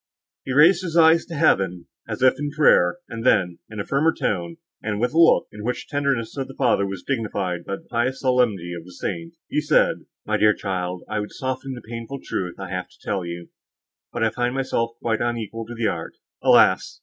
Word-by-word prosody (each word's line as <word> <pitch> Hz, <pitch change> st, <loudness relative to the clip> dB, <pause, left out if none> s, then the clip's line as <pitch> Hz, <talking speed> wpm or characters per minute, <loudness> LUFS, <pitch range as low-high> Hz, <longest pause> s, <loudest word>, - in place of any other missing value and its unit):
He 130 Hz, -, -3 dB
raised 165 Hz, +7 st, +6 dB
his 170 Hz, -2 st, -2 dB
eyes 165 Hz, 0 st, +6 dB
to 170 Hz, -, -6 dB
heaven, 95 Hz, -, +2 dB, 0.2 s
as 125 Hz, -, -3 dB
if 130 Hz, -, +4 dB
in 145 Hz, 0 st, -2 dB
prayer, 145 Hz, -, +4 dB
and 115 Hz, -1 st, -6 dB
then, 90 Hz, -8 st, +2 dB
in 110 Hz, -1 st, -7 dB
a 100 Hz, -, -3 dB
firmer 150 Hz, +4 st, +2 dB
tone, 85 Hz, -, -2 dB, 0.2 s
and 105 Hz, -1 st, -2 dB
with 125 Hz, +4 st, 0 dB
a 165 Hz, -, +2 dB
look, 165 Hz, -, +5 dB
in 105 Hz, 0 st, -9 dB
which 125 Hz, +2 st, -3 dB
the -, -, -25 dB
tenderness 140 Hz, -5 st, 0 dB
of 135 Hz, -, -2 dB
the 135 Hz, -, -11 dB
father 120 Hz, -6 st, +2 dB
was 95 Hz, -2 st, -6 dB
dignified 100 Hz, -9 st, -2 dB
by 100 Hz, -, -3 dB
the -, -, -14 dB
pious 130 Hz, +3 st, -1 dB
solemnity 120 Hz, -, +1 dB
of 85 Hz, -1 st, -7 dB
the 90 Hz, +1 st, -14 dB
saint, 165 Hz, -, -5 dB
he 150 Hz, -, 0 dB
said, 150 Hz, +1 st, +2 dB, 0.2 s
"My -, -, +1 dB
dear 105 Hz, 0 st, +4 dB
child, 90 Hz, -2 st, -3 dB
I 110 Hz, -1 st, -2 dB
would 105 Hz, -, -5 dB
soften 130 Hz, 0 st, -4 dB
the 120 Hz, -3 st, -10 dB
painful 115 Hz, +4 st, -6 dB
truth 90 Hz, -2 st, -3 dB
I -, -, -7 dB
have -, -, -4 dB
to -, -, -23 dB
tell 95 Hz, -, -2 dB
you, 85 Hz, 0 st, -7 dB, 0.6 s
but 120 Hz, -, -2 dB
I 110 Hz, -, +2 dB
find 120 Hz, +2 st, -1 dB
myself 115 Hz, -3 st, -1 dB
quite 115 Hz, -1 st, -1 dB
unequal 115 Hz, -2 st, -3 dB
to 120 Hz, -, -7 dB
the 115 Hz, -1 st, -2 dB
art. 80 Hz, -3 st, -5 dB, 0.3 s
Alas! -, -, +4 dB
115 Hz, 220 wpm, -23 LUFS, 100-135 Hz, 0.6 s, raised